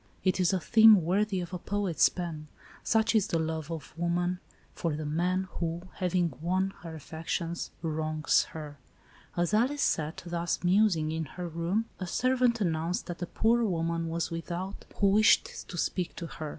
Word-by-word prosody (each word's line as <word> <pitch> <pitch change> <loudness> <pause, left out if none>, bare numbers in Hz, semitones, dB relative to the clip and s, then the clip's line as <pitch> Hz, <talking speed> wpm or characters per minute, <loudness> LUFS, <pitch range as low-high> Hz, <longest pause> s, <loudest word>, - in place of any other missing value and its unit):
It 185 0 +2
is 180 -2 +3
a 190 - +1
theme 220 0 +7
worthy 190 +3 +1
of 175 +1 -7
a 180 - -3
poet's 200 -3 +2
pen. 165 -4 -5 0.4
Such 225 0 +2
is 215 -2 +3
the 165 - 0
love 160 -1 -2
of 165 -3 -6
wo 170 +1 -1
man 175 +1 0 0.3
for 165 -3 -2
the 155 0 -4
man, 180 +5 0
who, 170 0 -2
having 180 -3 +1
won 185 +3 0
her 165 -2 -7
affections, 165 +2 -4
wrongs 155 -1 +1
her. 150 -3 -9 0.6
As 175 +3 +1
Alice 260 +7 +2
sat, 155 0 -1
thus 170 0 -2
musing, 180 -4 +3
in 160 0 -2
her 175 +5 -6
room, 170 +7 -1
a 185 - -4
servant 250 +3 +2
announced 170 -2 -1
that 175 0 -7
a 175 - -2
poor 230 +5 +2
woman 165 -4 -1
was 165 0 -2
with 165 0 -5
out, 185 +3 -5
who 200 - +3
wished 215 +2 +3
to 175 - -6
speak 180 +1 -1
to 170 - -5
her. 155 -2 -6
175 Hz, 180 wpm, -29 LUFS, 165-190 Hz, 0.6 s, theme